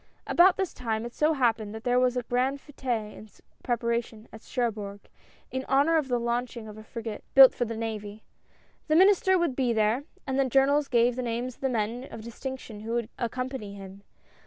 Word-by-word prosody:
About 360 +2 +5
this 380 -3 -2
time, 225 -2 -3
it 240 - -7
so 305 +1 +2
happened, 225 -6 0
that 220 - -8
there 245 0 +2
was 250 0 +2
a 250 - -1
grand 255 +4 0
f^te 245 -7 -4
in 215 - -12 0.3
preparation, 235 -2 -2
at 220 - -10
Cherbourg, 210 -6 -3 0.5
in 260 0 -3
honor 285 +5 +4
of 305 -4 +1
the 245 -2 0
launching 235 -1 -3
of 210 - -9
a 215 - -11
frigate, 225 -1 -7
built 270 -1 +10
for 245 - -1
the 230 -1 -5
navy. 215 -2 -5 0.6
The 310 - +2
Minister 380 +1 +5
would 340 -7 0
be 250 -3 +1
there, 220 +5 +1 0.2
and 265 0 -1
the 270 - +4
journals 275 +3 +3
gave 240 -1 +3
the 255 - -2
names 240 +1 -3
of - - -26
the 265 - +1
men 235 +2 -2
of 225 - -9
distinction 235 -1 -7
who 225 +2 -5
would 235 -1 -1
accom 255 +2 -2
pany 210 -7 -6
him. 195 0 -11
240 Hz, 205 wpm, -27 LUFS, 220-265 Hz, 0.6 s, built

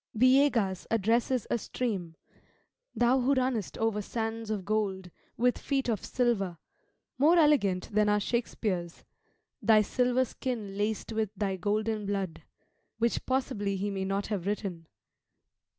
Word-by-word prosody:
Villegas 250 -6 +3
addresses 225 +3 +1
a 235 - +1
stream 195 -8 -3 0.8
"Thou 245 +2 +3
who 265 +3 +2
runnest 255 -5 -1
over 225 -2 0
sands 225 +1 -4
of 205 -4 -2
gold, 195 -4 -1 0.3
with 245 +1 +2
feet 270 -2 -1
of 220 -5 -1
silver," 210 -9 0 0.6
more 320 +6 +5
elegant 265 - +3
than 210 0 +3
our 210 0 +3
Shakspeare's 200 -6 -2 0.6
"Thy 215 -1 +5
silver 250 +3 +1
skin 225 -6 -4
laced 210 +2 -2
with 220 -2 0
thy 195 -2 0
golden 210 +2 -1
blood," 195 -4 -3 0.6
which 230 +1 0
possibly 255 -7 0
he 200 +2 -2
may 195 -1 -2
not 195 +1 -1
have 200 -4 -3
written. 190 -5 -3
215 Hz, 135 wpm, -29 LUFS, 195-245 Hz, 0.8 s, more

